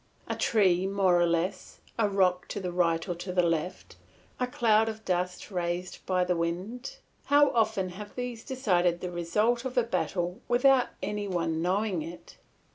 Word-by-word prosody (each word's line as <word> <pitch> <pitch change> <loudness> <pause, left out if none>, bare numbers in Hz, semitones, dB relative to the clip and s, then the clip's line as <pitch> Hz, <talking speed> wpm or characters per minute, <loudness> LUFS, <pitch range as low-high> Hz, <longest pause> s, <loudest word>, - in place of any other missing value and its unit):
A - - -2
tree 190 -4 +2
more 190 -3 +3
or 175 - +4
less, 170 +2 -2 0.2
a 210 -2 +3
rock 185 -2 +2
to - - -4
the 180 -2 -3
right 165 -2 +1
or 175 - -1
to 175 +2 -6
the 180 0 +2
left, 170 +1 -2 0.4
a 250 - +1
cloud 225 -2 +3
of 220 0 -8
dust 180 +2 -2
raised 175 0 -3
by 185 -1 +2
the 180 0 0
wind, 185 - -3 0.3
how 285 -1 +5
often 220 -6 +1
have 205 +3 -9
these 245 -2 -5
decided 180 -10 +1
the 180 - -4
result 210 +8 +1
of 260 -1 -5
a 245 - +5
battle 185 -3 -2
without 255 +1 +4 0.2
any 205 +1 -2
one 165 -3 -1
knowing 190 0 0
it? 165 +3 -10
185 Hz, 175 wpm, -28 LUFS, 175-220 Hz, 0.4 s, how